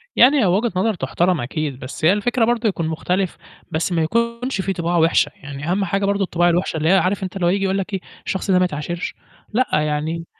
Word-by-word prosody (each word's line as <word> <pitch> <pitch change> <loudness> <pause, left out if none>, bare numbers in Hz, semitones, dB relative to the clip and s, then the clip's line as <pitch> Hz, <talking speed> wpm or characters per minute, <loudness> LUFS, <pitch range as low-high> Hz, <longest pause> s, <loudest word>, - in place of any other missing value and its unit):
يعني 270 +4 +6
هي 210 - +3
وجهة 200 +6 +2
نظر 215 +4 +1
تُحتَرَم 175 +2 0
أكيد، 135 +1 -3
بس 130 +4 -5
هي 175 - +6
الفكرة 230 +3 +1
برضو 235 -1 +1
يكون 170 -5 -1
مختلف 180 +3 -1 0.3
بس 160 +4 -1
ما 165 -2 +1
يكونش 235 +4 -1
فيه 195 0 -1
طباع 170 0 -1
وحشة، 165 0 +3
يعني 145 +3 -6
أهَم 195 +1 +1
حاجة 195 +2 0
برضو 200 0 +1
الطباع 175 -1 +2
الوحشة 175 -1 0
اللي 160 +1 +1
هي 195 - +6
عارف 190 +1 +1
أنت 185 +1 -5
اللي 180 -3 -1
هو - - +4
ييجي 195 +2 +1
يقول 190 +1 +1
لك 195 +1 -4
إيه، 195 - 0 0.3
الشخص 190 +1 -2
ده 180 - +5
ما 185 - +4
يتعاشرش، 170 +2 -4 0.4
لأ، 255 +3 +2
يعني 155 +2 -2
185 Hz, 230 wpm, -20 LUFS, 165-200 Hz, 0.4 s, يعني